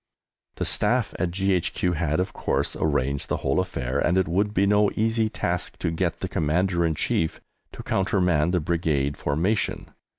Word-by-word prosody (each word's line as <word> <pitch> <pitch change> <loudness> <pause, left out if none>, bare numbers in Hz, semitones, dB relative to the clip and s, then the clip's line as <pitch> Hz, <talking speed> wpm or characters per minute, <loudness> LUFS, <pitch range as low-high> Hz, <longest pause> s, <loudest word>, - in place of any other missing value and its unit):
The - - -2
Staff - - +2
at 90 - +1
G.H.Q. 90 -1 0
had, 80 0 0
of 95 +1 -2
course, - - -1
arranged 70 -2 -1
the - - 0
whole - - +2
affair, 65 +3 -2
and 85 +4 +2
it 95 - +2
would 100 +5 +1
be 100 -1 +2
no 105 0 +4
easy 110 0 +1
task 90 -4 -3
to 85 - -1
get 85 0 -2
the - - -1
Commander 85 +3 +1
in 80 -2 +1
Chief 80 +1 -1 0.3
to - - -8
countermand 90 -5 +1
the 90 - +2
Brigade 75 -4 0
formation. 85 +9 -1
85 Hz, 170 wpm, -25 LUFS, 80-95 Hz, 0.3 s, no